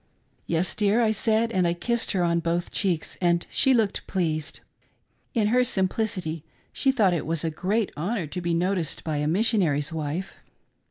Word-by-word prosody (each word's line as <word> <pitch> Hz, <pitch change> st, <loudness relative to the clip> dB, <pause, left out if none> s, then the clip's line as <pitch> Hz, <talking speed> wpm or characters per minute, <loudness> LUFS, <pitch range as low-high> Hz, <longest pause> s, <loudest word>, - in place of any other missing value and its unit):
" -, -, -41 dB
Yes, 170 Hz, +2 st, +1 dB
dear," 210 Hz, +1 st, +2 dB
I 220 Hz, -, +3 dB
said, 220 Hz, +1 st, +1 dB
and 185 Hz, -5 st, +2 dB
I 170 Hz, -, 0 dB
kissed 235 Hz, +6 st, -1 dB
her 185 Hz, -2 st, +1 dB
on 170 Hz, 0 st, +2 dB
both 170 Hz, +1 st, -2 dB
cheeks 180 Hz, -6 st, -1 dB
and 170 Hz, -1 st, +2 dB
she 265 Hz, -, +4 dB
looked 225 Hz, -6 st, +1 dB
pleased, 155 Hz, -5 st, -2 dB, 0.4 s
— -, -, -44 dB
in 215 Hz, -3 st, +2 dB
her 250 Hz, +2 st, +4 dB
simplicity 190 Hz, -, -1 dB, 0.3 s
she 270 Hz, -, +2 dB
thought 210 Hz, -9 st, +3 dB
it 170 Hz, -, -2 dB
was 165 Hz, -1 st, 0 dB
a 165 Hz, -, -1 dB
great 200 Hz, +6 st, -1 dB
honor 185 Hz, +4 st, -2 dB
to 180 Hz, +5 st, -5 dB
be 170 Hz, -1 st, 0 dB
noticed 175 Hz, -2 st, -1 dB
by 155 Hz, -2 st, -2 dB
a 150 Hz, 0 st, 0 dB
missionary's 170 Hz, -6 st, +1 dB
wife. 160 Hz, +4 st, -3 dB
180 Hz, 185 wpm, -25 LUFS, 165-215 Hz, 0.4 s, she